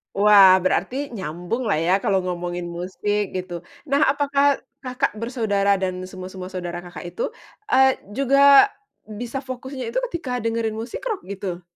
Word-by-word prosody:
Wah 200 -2 +7
berarti 195 +6 0 0.2
nyambunglah 185 +4 -2
ya 185 - +4
kalau 195 -4 +2
ngomongin 175 -1 -4
musik 205 +3 -2
gitu. 180 -1 -4 0.4
Nah 280 - +3
apakah 280 0 +1 0.4
Kakak 255 -3 -1
bersaudara 205 -5 +1
dan 185 -1 -2 0.2
semua-semua 185 0 -8
saudara 175 -2 -5
Kakak 175 0 -10
itu, - - -3 0.5
eee, 265 -4 +5 0.2
juga 275 +4 +7 0.5
bisa 245 +2 -4
fokusnya 260 +1 -6
itu - - -2
ketika 255 -8 -3
dengerin 225 -1 -1
musik 230 - -6
rock 440 -6 -2
gitu? 190 -3 -5
210 Hz, 140 wpm, -22 LUFS, 185-260 Hz, 0.5 s, Wah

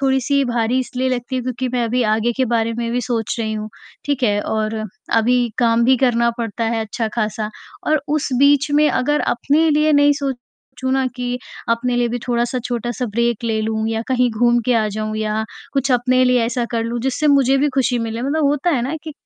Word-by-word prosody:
थोड़ी-सी 275 +1 +2
भारी 240 0 0
इसलिए 255 0 -2
लगती 250 0 -3
हैं 255 - -2
क्योंकि 255 +1 -3
मैं 245 -1 0
अभी 245 +2 0
आगे 220 +2 +1
के 260 - +2
बारे 230 0 +1
में 235 -1 -2
भी 245 - 0
सोच 230 -2 -2
रही 220 -1 -2
हूँ, 215 0 -4 0.4
ठीक 285 -2 -1
है? 205 -4 +2
और 215 +1 -2 0.4
अभी 235 +3 +3 0.2
काम 235 -1 +3
भी 260 +1 +5
करना 235 -2 +2
पड़ता 230 0 -3
है 225 0 0
अच्छा 220 +1 -3
ख़ासा। 215 -1 -2 0.4
और 310 -1 +2 0.2
उस 305 - -1
बीच 285 +1 +4
में 300 0 +5
अगर 295 +4 +1
अपने 290 +6 +2
लिए 305 +1 +3
नहीं 290 0 +5
सोचूँ 260 -1 -5
ना 265 -1 +1
कि 245 0 -3 0.3
अपने 240 +1 0
लिए 240 0 +1
भी 240 +1 -2
थोड़ा-सा 240 +1 0
छोटा-सा 240 0 -3
ब्रेक 235 +1 0
ले 220 -1 0
लूँ 220 0 -1
या 225 0 -1
कहीं 250 -1 +2
घूम 240 +2 +2
के 250 - +3
आ 220 -1 +2
जाऊँ 215 +1 -4
या 215 0 -1 0.3
कुछ 275 -1 +1
अपने 255 +1 +3
लिए 250 -1 +3
ऐसा 240 +1 -1
कर 230 -1 -1
लूँ 235 +1 -3
जिससे 265 +4 -1
मुझे 275 -2 +4
भी 290 +2 +2
खुशी 250 -2 +1
मिले। 230 0 -3
मतलब 295 +4 0
होता 295 +4 +1
है 265 -7 +1
ना 270 +6 -2
कि 315 - -6
245 Hz, 215 wpm, -19 LUFS, 230-265 Hz, 0.4 s, भी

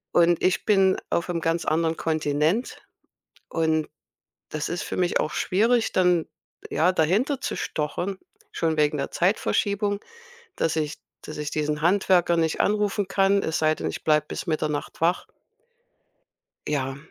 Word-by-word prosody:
Und 170 -1 +4
ich 185 - +1
bin 195 -3 +4 0.2
auf'm 170 0 -1
ganz 165 +1 0
anderen 160 +1 +1
Kontinent. 155 - 0 0.7
Und 160 -1 0 0.6
das 155 0 -3
ist 175 +1 -3
für - - -5
mich 180 -1 +1
auch 155 - -1
schwierig, 225 +5 +1
dann, 180 -3 +3 0.5
ja, 180 +3 +3
dahinter 200 - +1
zu - - -3
stochern, 175 +6 -3 0.3
schon 160 -1 0
wegen 150 -1 +2
der 140 - -3
Zeitverschiebung, 200 +2 0 0.6
dass 160 0 0
ich 150 -1 -2 0.2
dass 155 - -8
ich 150 -1 -4
diesen 150 0 -2
Handwerker 180 -1 +3
nicht 160 -1 0
anrufen 205 -1 +1
kann, 195 0 +3
es 160 0 -1
sei 155 0 +3
denn, - - -4
ich - - -7
bleibe 150 -1 +3
bis - - -5
Mitternacht 155 -2 -2
wach. 170 +3 +1 1.4
Ja, 135 -2 -2
165 Hz, 145 wpm, -25 LUFS, 155-190 Hz, 1.4 s, Und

